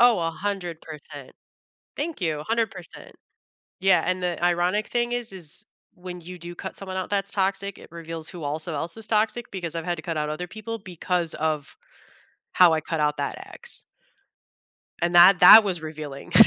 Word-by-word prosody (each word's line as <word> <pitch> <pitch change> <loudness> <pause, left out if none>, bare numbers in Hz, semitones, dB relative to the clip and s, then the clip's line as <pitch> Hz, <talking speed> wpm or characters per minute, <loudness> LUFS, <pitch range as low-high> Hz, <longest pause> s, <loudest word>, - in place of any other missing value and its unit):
Oh, 240 -3 +6
100%. 165 -5 -5 0.6
Thank 310 -4 -4
you, 155 -4 -1
100%. 225 -1 -3 0.7
Yeah, 190 0 +4
and 185 0 0
the 175 -1 -2
ironic 175 +4 +2
thing 240 0 0
is 245 -3 -3
is 170 -6 -8 0.3
when 180 0 -8
you 180 +2 -9
do 175 +1 -8
cut - - -7
someone 190 -1 -6
out 185 - -3
that's 200 -1 0
toxic, 195 0 -1
it - - -13
reveals 165 -1 -7
who 175 -3 -8
also 155 +3 -3
else 165 +6 -4
is 225 -1 -8
toxic 220 +2 0
because 175 -4 -5
I've 165 -1 -3
had 175 0 -1
to 160 - -8
cut 165 -1 -3
out 150 0 -1
other 155 +4 -4
people 220 +4 -6
because 180 -2 -2
of 155 -2 -2 0.8
how 180 -2 +7
I 160 - +2
cut 165 0 -3
out 150 0 +1
that 140 - -2 0.2
ex. - - -2 1.2
And 175 +1 0
that 180 +2 +8
that 220 - +11
was 185 -4 -1
revealing. 155 -3 -7
175 Hz, 175 wpm, -25 LUFS, 160-200 Hz, 1.2 s, that